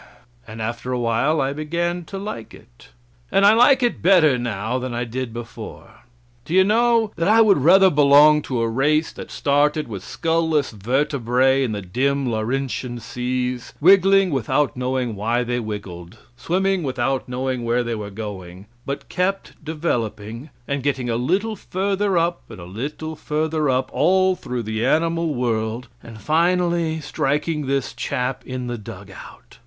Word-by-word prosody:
And 110 0 -6
after 120 +3 -4
a 125 - 0
while 120 +7 +1
I 135 +1 0
began 170 +3 -2
to 195 - -7
like 195 - -7
it, - - -19 0.4
and 195 +1 +4
I 205 - +7
like 255 +3 +5
it 240 - 0
better 170 -6 +5
now 120 0 -2
than 125 -1 -4
I 120 - -1
did 125 +1 -4
before. 115 0 -10 0.4
Do 165 - -3
you 190 - +7
know 225 +1 +2
that 170 +1 0
I 220 +2 +5
would 205 -8 +5
rather 190 +6 +6
belong 150 +1 +6
to 125 -3 -1
a 115 - +1
race 150 +7 +1
that - - -9
started 150 0 +1
with 100 -5 -7
skull 165 0 -1
less 150 -4 +1
vertebrae 130 +3 +1
in 120 -4 -2
the 100 -1 -5
dim 135 +8 0
Laurentian 120 +2 -2
seas, 125 +1 -3
wiggling 195 +2 +5
without 140 +2 0
knowing 125 -2 -2
why 115 +4 0
they 120 0 -2
wiggled, 100 -6 -7 0.2
swimming 190 +8 0
without 130 -2 -2
knowing 130 0 -2
where 120 +1 +1
they 120 -1 -3
were 105 -2 -5
going; 95 -3 -8 0.2
but 140 0 -4
kept 190 -2 -3
developing 120 -6 -3 0.2
and 140 0 -2
getting 130 -3 -1
a - - 0
little 190 - 0
further 195 0 -1
up 170 +1 0
and 110 -4 -10
a 85 - -9
little 145 - -6
further 155 0 -1
up, 130 0 0
all 185 0 +3
through 125 -7 -5
the 110 +1 -3
animal 165 +3 +1
world, 115 0 -2
and 115 -2 -11
finally 170 - +1
striking 150 0 -2
this 135 -1 -1
chap 125 +1 -3
in 130 -1 -4
the 120 -1 -4
dug 105 - -10
out. - - -14
135 Hz, 165 wpm, -21 LUFS, 120-165 Hz, 0.4 s, I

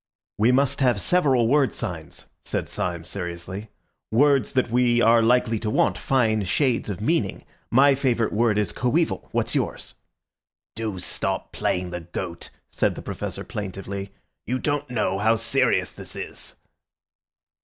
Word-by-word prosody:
"We 115 +4 +5
must 140 +1 +2
have 125 -6 +3
several 135 - +3
word 140 +1 +3
signs," 80 -3 -5 0.2
said - - -3
Syme 85 -2 -3
seriously—"words 100 - -2
that 130 -4 +1
we 120 -1 +3
are 115 0 +5
likely 115 -1 +3
to 110 - -2
want, - - +2
fine 110 -5 +1
shades 120 +4 +1
of 100 0 -4
meaning. 110 - 0 0.2
My 135 +4 +6
favourite 125 -4 0
word 110 -1 +2
is 105 -2 0
'coeval'. 150 +7 0
What's - - 0
yours?" - - -2 0.8
"Do 110 -3 -3
stop 90 - -3
playing 90 0 -1
the 90 0 -4
goat," 85 +1 -6 0.2
said - - +1
the - - -8
Professor - - -5
plaintively. 100 -1 -6 0.4
"You 125 - 0
don't 145 0 -1
know 105 -5 0
how 110 +2 +3
serious 115 0 +1
this - - -9
is." - - -7
115 Hz, 145 wpm, -24 LUFS, 100-130 Hz, 0.8 s, My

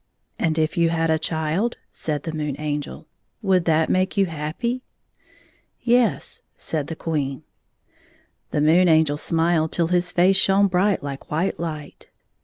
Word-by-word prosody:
" - - -43
And 160 -2 0
if 160 +3 0
you 170 -1 +3
had 165 -1 +1
a 160 - +2
child," 160 +8 -1
said 150 -3 -2
the 160 - -5
Moon 150 -3 -3
Angel, 150 -1 -4 0.4
"would 185 -3 +2
that 160 -1 +3
make 185 +2 0
you 195 - +4
happy?" 165 +10 -3 0.5
" - - -34 0.2
Yes," 205 - -1 0.2
said 150 -3 -2
the 165 - -5
Queen. 145 -5 -3 1.1
The 150 - 0
Moon 170 +4 +5
Angel 160 -3 +4
smiled 165 0 +1
till 170 -1 0
his 180 0 +1
face 185 +2 +4
shone 195 +1 +4
bright 190 -1 +1
like 140 -1 -7
white 165 +5 -1
hght. 155 -3 -6
165 Hz, 160 wpm, -23 LUFS, 155-180 Hz, 1.1 s, Moon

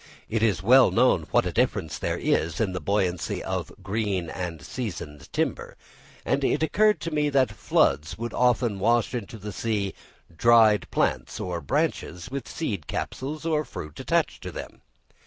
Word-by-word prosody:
It 110 0 -1
is 100 -6 +2
well 130 +5 +7
known 115 -10 +3
what - - +3
a - - -1
difference 80 -3 0
there - - -1
is 80 0 0
in 105 -4 +1
the 90 - -4
buoyancy 90 0 -1
of - - -3
green 100 -4 -1
and 85 -3 -4
seasoned 75 - -6
timber; - - -2 0.5
and 140 - +1
it 145 - +1
occurred 210 +6 +3
to 165 - -3
me 150 -1 +1
that 135 -2 +3
floods 75 +4 +1
would 115 +1 -4
often 120 -4 +2
wash 115 +5 +2
into 115 -2 -5
the 105 0 -6
sea 105 -3 -1 0.4
dried 110 +1 +5
plants - - -1
or 90 -2 -3
branches 135 - -2
with 135 -3 -4
seed 100 - -3
capsules 150 +4 -4
or 155 -2 +1
fruit 75 - -8
attached - - 0
to - - -6
them. - - -8
110 Hz, 165 wpm, -26 LUFS, 90-130 Hz, 0.5 s, well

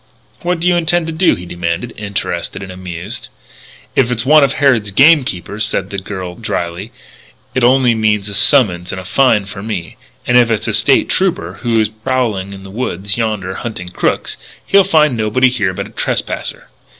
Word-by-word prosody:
"What 175 0 -1
do 170 - 0
you 180 - +4
intend 175 0 +1
to 165 - -4
do?" 170 +2 +3
he 90 - -9
demanded, 85 +6 -3
interested 100 -1 -4
and 95 - -8
amused. 90 -2 -6 0.7
"If 125 -3 +3
it's 120 -1 -1
one 150 +2 +6
of 135 -1 +2
Harrod's 130 -7 +2
game 140 +8 +6
keepers," 100 -1 -3
said 100 -3 -1
the 100 - -2
girl 95 -2 -6
drily, 95 -1 -4 0.6
"it 130 - 0
only 125 0 +4
means 105 -2 +1
a 100 - -6
summons 100 - +3
and 95 - -5
a 90 - -9
fine 110 -2 +3
for 100 0 -8
me. 100 -6 -5 0.3
And 125 - +3
if 120 -1 +5
it's 110 -1 -1
a 110 - -1
State 120 +6 +3
Trooper, 100 - -1
who 115 -2 +1
is 110 -1 +1
prowling 110 -3 -2
in 95 -1 -10
the 95 - -10
woods 100 -3 -3
yonder 105 -5 -2
hunting 95 -7 -6
crooks, 90 - -1 0.3
he'll 200 0 +5
find 155 -7 +3
nobody 115 +4 +2
here 105 -7 0
but 95 - -5
a - - -12
trespasser. - - -3
110 Hz, 190 wpm, -15 LUFS, 95-130 Hz, 0.7 s, one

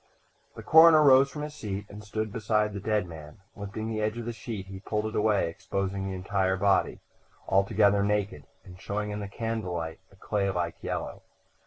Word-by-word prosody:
III - - -38
The - - -9
coroner 160 -1 +7
rose 135 -1 +6
from 150 +1 -6
his 150 0 -6
seat 100 -7 -5
and 105 +1 -11
stood 110 0 -4
beside 105 -1 0
the 100 - -4
dead 105 -1 0
man. 75 -3 -11 0.2
Lifting 105 +2 -5
an 110 -1 -2
edge 110 +2 -1
of 120 - -5
the 120 - -3
sheet 110 -4 -6
he 95 0 -9
pulled 105 +2 -2
it 110 - -4
away, 105 -4 +2
exposing 95 +3 -3
the 95 - -4
entire 95 0 0
body, 100 0 +1 0.5
altogether 100 +1 +3
naked 105 -1 -1 0.2
and 95 -1 -13
showing 105 +1 -3
in 105 - -4
the 100 - -5
candle 110 -3 -3
light 80 0 -4
a - - -19
clay 100 0 -1
like 90 -3 -3
yellow. - - -4
100 Hz, 200 wpm, -28 LUFS, 95-110 Hz, 0.5 s, coroner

